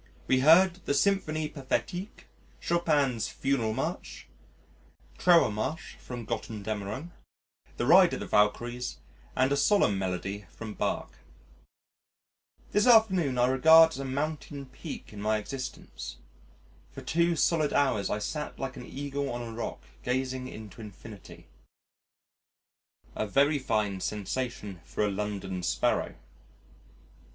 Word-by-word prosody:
We 130 - +3
heard 175 +6 +5
the 140 - +1
Symphonie 155 -5 +1
Pathétique, 150 - -4 0.4
Chopin's 150 -9 +1
Funeral 120 -6 -1
March, - - -4 0.9
Trauermarsch 160 -4 +2
from 120 -2 -7
Götterdammerung, 110 - -4 0.7
the - - -1
Ride - - +6
of - - -6
the - - -4
Valkyries 120 +4 +1 0.4
and 130 +1 +2
a - - +3
solemn 140 - +3
melody 95 +1 -3
from 110 +4 -8
Bach. - - -3 1.5
This 205 +4 +3
afternoon 190 - +5
I 120 - +4
regard 160 +6 +7
as 150 - -7
a - - -3
mountain 140 +1 -3
peak 135 -1 -9
in 100 - -8
my 110 +1 +1
existence. 125 - -7 0.7
For - - -10
two 170 +1 +2
solid 155 -1 +2
hours 135 -8 +1
I - - 0
sat 150 +8 -4
like 135 - -4
an - - -9
Eagle 140 0 -4
on 120 0 -4
a 115 -1 -7
rock 115 - -5 0.2
gazing 130 0 -2
into 110 -2 -10
infinity 105 -1 -11 1.7
a 110 - -2
very 140 +6 +3
fine 105 -6 -1
sensation 105 -2 -4
for 105 - -1
a 105 - 0
London 95 -2 -3
Sparrow.... 60 -7 0
130 Hz, 125 wpm, -29 LUFS, 105-150 Hz, 1.7 s, regard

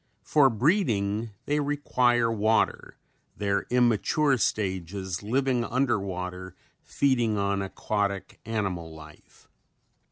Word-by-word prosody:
For 145 -3 +4
breeding 115 - +1 0.2
they 150 +1 0
require 125 -5 +1
water, 110 0 0 0.4
their 100 -1 -1
immature 125 +4 +2
stages 95 -3 -2
living 125 +3 0
under 125 -1 +1
water 90 -1 -6 0.3
feeding 120 -6 +1
on 100 0 0
aquatic 100 0 -3
animal 95 -8 -3
life. 75 -1 -16
110 Hz, 95 wpm, -27 LUFS, 95-125 Hz, 0.4 s, For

